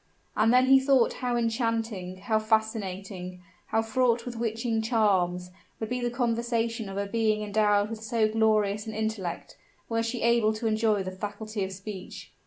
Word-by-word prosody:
And 220 +2 +4
then 255 +1 +5
he 270 +1 +7
thought 265 -3 +3
how 245 -1 0
enchanting, 225 -5 -2
how 220 -3 +1
fascinating, 195 -4 -2 0.2
how 225 - +1
fraught 235 0 +1
with 245 -1 -5
witching 230 0 -1
charms, 190 -6 +1 0.3
would 220 - -4
be 250 0 -2
the 240 - 0
conversation 235 -2 -1
of 195 - -6
a 200 - -1
being 215 0 0
endowed 205 0 +2
with 225 -1 -6
so 220 0 +1
glorious 215 -1 +1
an 220 - -5
intellect, 220 -6 -4 0.3
were 230 0 +1
she 230 +1 -3
able 235 -2 +3
to 215 - -5
enjoy 215 -2 +2
the 185 - -5
faculty 205 +2 -5
of 190 - -4
speech. 190 0 -8
220 Hz, 170 wpm, -27 LUFS, 205-230 Hz, 0.3 s, he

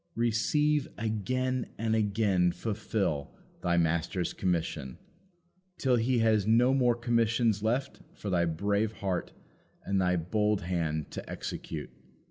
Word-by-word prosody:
Receive 140 +6 +2
again, 125 +4 -1
and 110 0 0
again 100 -4 +2
fulfil, 100 -9 -2 0.3
thy 85 -1 +1
Master's 85 +2 0
commission, 80 -7 -2 0.8
till 130 -2 +2
He 120 +2 +1
has 110 -3 +3
no 120 +4 +5
more 125 -3 +3
commissions 115 -2 +1
left 125 +6 -1
for 100 - -5
thy 85 -1 +3
brave 100 +6 0
heart 95 -4 -3 0.5
and 100 -1 +1
thy 90 0 +2
bold 105 +4 +1
hand 80 -4 -2
to - - -7
execute. - - -5
105 Hz, 120 wpm, -30 LUFS, 90-115 Hz, 0.8 s, no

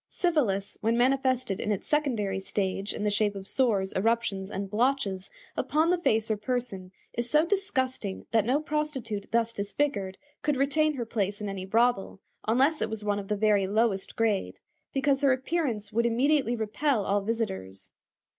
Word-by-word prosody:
Syphilis, 230 - 0
when 225 +2 +2
manifested 255 -4 +2
in 215 - -1
its 200 - -2
secondary 235 -11 0
stage 195 +1 -2
in - - -4
the 210 - +1
shape 205 0 +1
of 195 -1 -7
sores, 205 -5 +1
eruptions, 200 -2 0
and 195 0 -4
blotches 215 -3 0 0.3
upon 315 +3 +2
the 360 - +3
face 225 -8 +2
or 215 - +1
person, 210 -5 -3 0.2
is 235 0 -2
so 305 +4 +4
disgusting 260 - -1
that 225 -2 +4
no 255 +6 +2
prostitute 285 -9 -3
thus 230 0 +1
disfigured 200 -2 -2 0.2
could 295 -2 0
retain 300 +3 +2
her 240 -3 -3
place 205 -3 -2
in 210 - -4
any 195 -1 -4
brothel, 225 -2 +1 0.3
unless 270 +8 +3
it 220 - 0
was 220 -1 -4
one 205 -1 0
of 195 - -7
the 210 - 0
very 205 -2 +3
lowest 205 -1 0
grade, 220 -4 0 0.3
because 275 0 +1
her 275 -2 +5
appearance 255 -6 -2
would 235 +2 +2
immediately 255 +1 +2
repel 220 +1 0
all 200 +1 +1
visitors. 95 - -4
225 Hz, 170 wpm, -28 LUFS, 200-270 Hz, 0.3 s, her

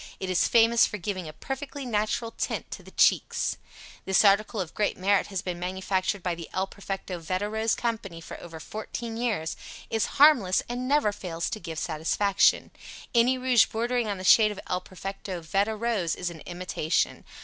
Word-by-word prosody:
It 190 -1 -3
is 180 - +3
famous 230 0 +5
for 210 - -5
giving 185 -2 -4
a - - -10
perfectly 270 - -6
natural 225 0 -1
tint - - -3
to - - -6
the - - -14
cheeks. - - +2 0.5
This 190 +2 +4
article 210 +2 +3
of 175 -4 -4
great 210 - 0
merit 195 +2 +2
has 195 -3 -4
been 180 -2 -4
manufactured 185 +1 -1
by 180 - 0
the 170 -1 -8
El 190 - 0
Perfecto 195 -2 -6
Veda 185 +5 -2
Rose 220 +1 0
Co. 230 -2 -1 0.2
for - - -9
over 165 -2 -9
fourteen 225 +6 -6
years, 220 -9 -1 0.4
is 225 -1 +1
harmless 265 -11 +6
and 245 +1 -3
never 285 -6 +3
fails 175 -5 -4
to 215 - -3
give 165 -3 -7
satisfaction. 175 +5 +2 0.4
Any 245 +2 +4
rouge 255 -2 +4
bordering 235 +1 -1
on 200 -2 -2
the 185 - -7
shade 215 +3 +7
of 210 - -6
El 180 0 -2
Perfecto 190 0 -6
Veda 195 +6 0
Rose 215 -7 -1
is 180 -1 -3
an 165 - -10
imitation. 175 -2 -1
200 Hz, 180 wpm, -27 LUFS, 180-230 Hz, 0.5 s, shade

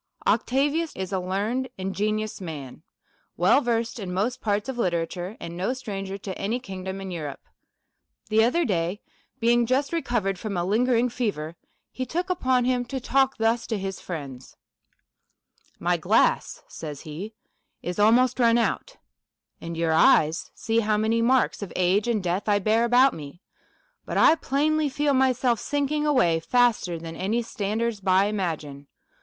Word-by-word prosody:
Octavius 285 +8 +1
is 190 -1 -5
a 190 - +1
learned, 210 +8 -2
ingenious 210 +3 -2
man, 150 -7 -7 0.6
well 180 - +4
versed 230 -2 -1
in 190 -4 -5
most 225 +8 -1
parts 205 0 -1
of 260 -2 -4
literature, 175 +1 -2
and 170 - -7
no 190 +8 -1
stranger 195 -6 -5
to 195 -1 -6
any 225 +5 -1
king 190 -6 -8
dom 190 +1 -5
in 190 -1 -6
Europe. 150 -5 -6 0.9
The 220 +1 +4
other 325 +9 +2
day, 180 -1 -1 0.4
being 235 0 +3
just 270 +5 0
recovered 225 - -1
from 200 -3 -4
a 175 - 0
lingering 240 +4 +2
fever, 180 -10 -3 0.4
he 260 - -4
took 350 +8 -2
upon 260 -8 +1
him 250 -1 +1
to 265 +2 -4
talk 270 +1 +1
thus 225 +1 +1
to 220 - -1
his 195 -1 -4
friends: 140 -7 -8 0.6
" - - -40
My - - +3
glass," - - +1
says 150 -3 -7
he, 180 +9 -7 0.2
" - - -50
is 175 +2 -4
almost 240 +5 +4
run 235 -1 +5
out; 240 - -1 0.6
and 170 0 -6
your 165 -1 +1
eyes 160 0 +4
see 225 +1 0
how 215 -1 +1
many 220 +2 +1
marks 250 0 +2
of 200 - -6
age 185 +4 +2
and 220 -5 0
death 185 +4 -1
I 205 - +4
bear 220 +3 +2
about 250 +3 +5
me; 145 +1 -9 0.7
but - - -2
I - - +7
plainly 310 0 0
feel 290 +1 0
myself 255 -3 +2
sinking 290 +1 -1
away 205 - +3
faster 225 -2 +2
than 165 0 -8
any 215 +7 -1
standers 220 +1 -2
by 190 0 +3
imagine. 155 -9 -3
215 Hz, 165 wpm, -25 LUFS, 185-250 Hz, 0.9 s, I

